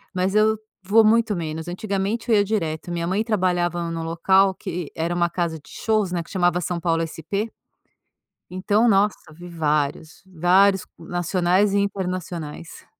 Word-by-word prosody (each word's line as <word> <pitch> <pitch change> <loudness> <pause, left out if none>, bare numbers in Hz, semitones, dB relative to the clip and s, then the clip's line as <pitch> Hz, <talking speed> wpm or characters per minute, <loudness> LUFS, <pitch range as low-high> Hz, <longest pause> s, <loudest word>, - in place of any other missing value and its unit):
mas 185 +2 0
eu 215 +1 +4 0.3
vou 220 +4 +5
muito 225 0 +3
menos. 160 -1 -4
Antigamente 200 +5 -3
eu - - +6
ia 205 - +3
direto. 170 -6 -2
Minha 170 -1 -2
mãe 200 +5 0
trabalhava 175 -5 0
num 165 0 -4
local 190 +4 +3
que 180 -5 -5
era 165 +2 -1
uma 175 0 +1
casa 170 -2 -2
de 145 - -20
shows, 215 -5 -1
né, 170 -1 -1
que - - -16
chamava 180 -2 +1
São 175 0 -2
Paulo 165 -1 0
SP. 195 +7 -4 1.0
Então, 205 +5 +2
nossa, 205 0 +3 0.2
vi 175 +3 -11
vários, 155 -2 -2
vários 190 +2 +3
nacionais 175 +3 +1
e - - +2
internacionais. 180 -5 -4
180 Hz, 155 wpm, -23 LUFS, 170-200 Hz, 1.0 s, eu